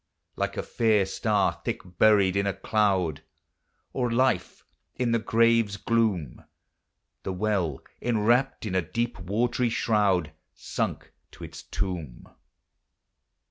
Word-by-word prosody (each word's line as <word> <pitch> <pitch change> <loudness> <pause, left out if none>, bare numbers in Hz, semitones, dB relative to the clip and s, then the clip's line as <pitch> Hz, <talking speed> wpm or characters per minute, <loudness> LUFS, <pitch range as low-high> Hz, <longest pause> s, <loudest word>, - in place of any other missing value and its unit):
Like - - -2
a - - -2
fair 110 -4 +2
star 105 +1 0
thick - - -3 0.2
buried 100 -3 +5
in 100 0 +1
a 100 - -1
cloud, 95 -8 +1 0.7
Or 125 -3 -1
life 115 -7 0 0.3
in 120 -2 0
the 115 - +2
grave's 115 -2 +2
gloom, 100 - 0 0.8
The 95 - -4
well, 95 -7 -1 0.2
enwrapped 120 +3 +1
in 100 - -3
a 95 - +2
deep 115 +6 -3
watery 115 +6 0
shroud, 100 -8 +1 0.2
Sunk - - -4 0.2
to - - -11
its - - -9
tomb. 85 -10 -5
105 Hz, 120 wpm, -26 LUFS, 95-115 Hz, 0.8 s, buried